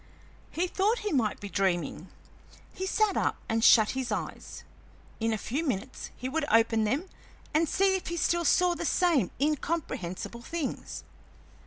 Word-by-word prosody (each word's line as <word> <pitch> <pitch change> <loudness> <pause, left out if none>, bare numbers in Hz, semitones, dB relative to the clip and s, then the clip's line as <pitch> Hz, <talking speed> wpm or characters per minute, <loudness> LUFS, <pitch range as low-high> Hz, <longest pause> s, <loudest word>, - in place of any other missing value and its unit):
He 345 - -1
thought 400 +5 +1
he 420 - 0
might 235 -8 +1
be 205 - -6
dreaming; 180 -4 -1 0.6
he 380 - -4
sat 430 +1 +2
up - - 0
and 225 0 0
shut 220 -3 +7
his 260 -1 -3
eyes; - - -5 0.6
in 225 0 0
a 220 - 0
few 270 +9 -3
minutes 255 -3 -3
he 255 - -4
would 310 +4 -1
open 225 -1 +4
them 280 - -1 0.5
and 315 0 +2
see 390 0 +3
if 375 - -4
he 340 - -3
still 340 +1 +1
saw 355 +2 +4
the 340 0 -5
same 330 - +2
incomprehensible 265 - -2
things. 315 +3 -5
275 Hz, 160 wpm, -29 LUFS, 225-345 Hz, 0.6 s, shut